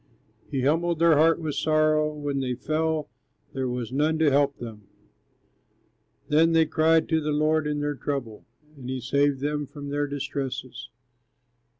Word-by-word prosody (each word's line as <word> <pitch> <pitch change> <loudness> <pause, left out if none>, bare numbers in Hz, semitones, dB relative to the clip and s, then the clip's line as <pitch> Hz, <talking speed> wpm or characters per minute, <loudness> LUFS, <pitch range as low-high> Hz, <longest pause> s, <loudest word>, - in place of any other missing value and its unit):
He 135 -3 -2
humbled 165 +4 +1
their 165 -1 +5
heart 160 +2 +4
with 155 -3 -3
sorrow; 155 0 +2
When 145 -2 -3
they 125 -2 -2
fell, 155 +3 -1 0.5
there 130 -1 -2
was 125 -1 -4
none 155 +3 +1
to 155 -2 +3
help 140 0 +2
them. 110 -4 -9 1.4
Then 160 +2 +3
they 165 0 +5
cried 160 +1 +2
to 160 -1 +2
the 150 - -3
Lord 155 +1 +1
in 150 0 -2
their 145 0 -1
trouble, 135 -6 -5 0.3
And 130 -3 -9
he 130 0 -3
saved 140 +2 +1
them 145 0 -2
from 145 0 -8
their 145 0 -1
distresses. 135 -3 -5
145 Hz, 160 wpm, -25 LUFS, 135-155 Hz, 1.4 s, their